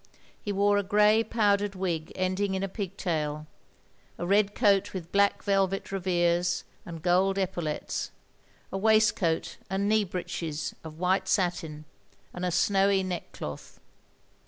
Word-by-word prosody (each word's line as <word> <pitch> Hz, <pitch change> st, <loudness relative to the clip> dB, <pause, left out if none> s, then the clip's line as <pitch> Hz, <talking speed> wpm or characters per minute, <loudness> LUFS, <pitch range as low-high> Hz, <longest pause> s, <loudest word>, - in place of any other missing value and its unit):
He 205 Hz, -, -3 dB
wore 205 Hz, +1 st, +3 dB
a -, -, -1 dB
grey 210 Hz, +3 st, +4 dB
powdered 205 Hz, -3 st, +1 dB
wig 170 Hz, -4 st, -2 dB
ending 190 Hz, +1 st, 0 dB
in 190 Hz, -, -2 dB
a -, -, 0 dB
pigtail; 165 Hz, -6 st, -3 dB, 0.7 s
a 175 Hz, -, -3 dB
red 200 Hz, +2 st, +2 dB
coat 205 Hz, -3 st, +2 dB
with 170 Hz, -3 st, -6 dB
black 200 Hz, 0 st, +2 dB
velvet 195 Hz, -1 st, 0 dB
revers 175 Hz, -2 st, +1 dB, 0.2 s
and 165 Hz, -2 st, -8 dB
gold 185 Hz, +2 st, +3 dB
epau 190 Hz, -2 st, -1 dB
lettes; 155 Hz, -2 st, -3 dB, 0.6 s
a 195 Hz, -, -2 dB
waistcoat 215 Hz, -6 st, +2 dB
and 195 Hz, +2 st, 0 dB
knee 215 Hz, 0 st, +3 dB
breeches 165 Hz, -4 st, -4 dB
of 155 Hz, -1 st, -9 dB
white 185 Hz, +2 st, +1 dB
satin, 170 Hz, -6 st, -1 dB, 0.5 s
and 180 Hz, -, -6 dB
a 180 Hz, -, +1 dB
snowy 195 Hz, +2 st, +3 dB
neck 180 Hz, -2 st, -4 dB
cloth. 75 Hz, -1 st, -8 dB
190 Hz, 140 wpm, -28 LUFS, 175-200 Hz, 0.7 s, grey